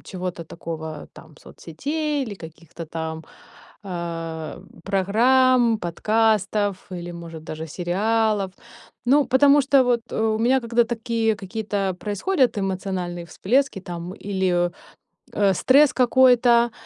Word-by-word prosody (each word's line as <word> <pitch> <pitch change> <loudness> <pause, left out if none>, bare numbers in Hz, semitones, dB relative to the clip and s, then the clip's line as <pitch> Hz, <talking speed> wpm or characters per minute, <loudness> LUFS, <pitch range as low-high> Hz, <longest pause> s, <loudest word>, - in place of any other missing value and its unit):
чего-то 180 -2 -5
такого, 160 -1 -7
там - - -15
соцсетей 290 - -3
или 220 -5 -7
каких-то 165 -1 -11
там, 160 0 -5 0.6
э, 165 -3 -5 0.2
программ, 235 +4 +3
подкастов 205 +1 0
или, 175 -1 -6
может, 165 -2 -9
даже 160 +1 -6
сериалов? 200 +4 0 0.5
Ну, 285 +3 +4
потому 285 +2 +5
что 270 -1 +4
вот, 245 -1 +2
э, - - -4
у 220 -1 +1
меня 255 +4 +3
когда 235 0 +2
такие 230 -1 -1
какие-то 200 -1 -3
происходят 245 - 0
эмоциональные 185 -2 -3
всплески 245 +3 0
там 175 -1 -7
или, 185 -3 0 0.6
э, 200 -2 +3
стресс 275 +8 +4
какой-то, 245 -2 +4
205 Hz, 115 wpm, -23 LUFS, 175-240 Hz, 0.6 s, потому